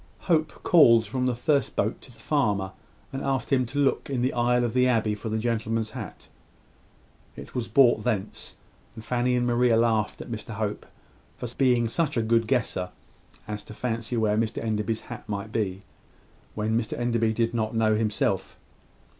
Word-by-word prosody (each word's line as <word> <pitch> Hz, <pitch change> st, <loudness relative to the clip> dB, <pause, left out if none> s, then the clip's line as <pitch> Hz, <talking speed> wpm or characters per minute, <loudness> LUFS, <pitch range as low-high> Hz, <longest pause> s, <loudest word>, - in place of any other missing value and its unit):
Hope 160 Hz, -3 st, 0 dB
called 115 Hz, -10 st, +6 dB
from 125 Hz, +5 st, -1 dB
the 125 Hz, -, 0 dB
first 140 Hz, +3 st, +1 dB
boat 110 Hz, +3 st, -1 dB
to 130 Hz, -, -13 dB
the 115 Hz, -, -18 dB
farmer, 105 Hz, -9 st, 0 dB, 0.4 s
and 135 Hz, -, -3 dB
asked 135 Hz, 0 st, -1 dB
him 130 Hz, -2 st, +2 dB
to 135 Hz, +4 st, -7 dB
look 140 Hz, -1 st, +1 dB
in 130 Hz, -3 st, -1 dB
the 130 Hz, -, +1 dB
aisle 120 Hz, 0 st, +2 dB
of 120 Hz, -, -1 dB
the 125 Hz, 0 st, +4 dB
abbey 110 Hz, -4 st, +2 dB
for 105 Hz, +2 st, -5 dB
the 110 Hz, -, -1 dB
gentleman's 115 Hz, -1 st, -1 dB
hat. -, -, -8 dB, 1.1 s
It -, -, -10 dB
was 120 Hz, -2 st, -2 dB
brought 120 Hz, -2 st, +4 dB
thence; 100 Hz, -3 st, -3 dB, 0.4 s
and 110 Hz, -, -10 dB
Fanny 125 Hz, +1 st, +1 dB
and 120 Hz, 0 st, +1 dB
Mary 120 Hz, +1 st, +3 dB
laughed 115 Hz, -2 st, +2 dB
at -, -, -8 dB
Mr 115 Hz, 0 st, -6 dB
Hope 105 Hz, -1 st, -3 dB, 0.5 s
for 125 Hz, -, -5 dB
being 125 Hz, -3 st, +3 dB
such 150 Hz, +3 st, -1 dB
a 115 Hz, -, +2 dB
good 115 Hz, 0 st, +2 dB
guesser 115 Hz, -8 st, 0 dB, 0.6 s
as 105 Hz, 0 st, -4 dB
to 110 Hz, -, -12 dB
fancy 115 Hz, 0 st, -2 dB
where 105 Hz, -2 st, +2 dB
Mr 110 Hz, -1 st, -1 dB
Enderby's 110 Hz, 0 st, -1 dB
hat 120 Hz, -3 st, -10 dB
might 105 Hz, +1 st, -4 dB
be, 100 Hz, -4 st, -2 dB, 0.7 s
when 110 Hz, +1 st, 0 dB
Mr 115 Hz, -1 st, -1 dB
Enderby 115 Hz, -2 st, +1 dB
did 115 Hz, +1 st, 0 dB
not 110 Hz, -1 st, -1 dB
know 110 Hz, -1 st, +3 dB
himself. 110 Hz, -1 st, -1 dB
115 Hz, 180 wpm, -26 LUFS, 110-125 Hz, 1.1 s, called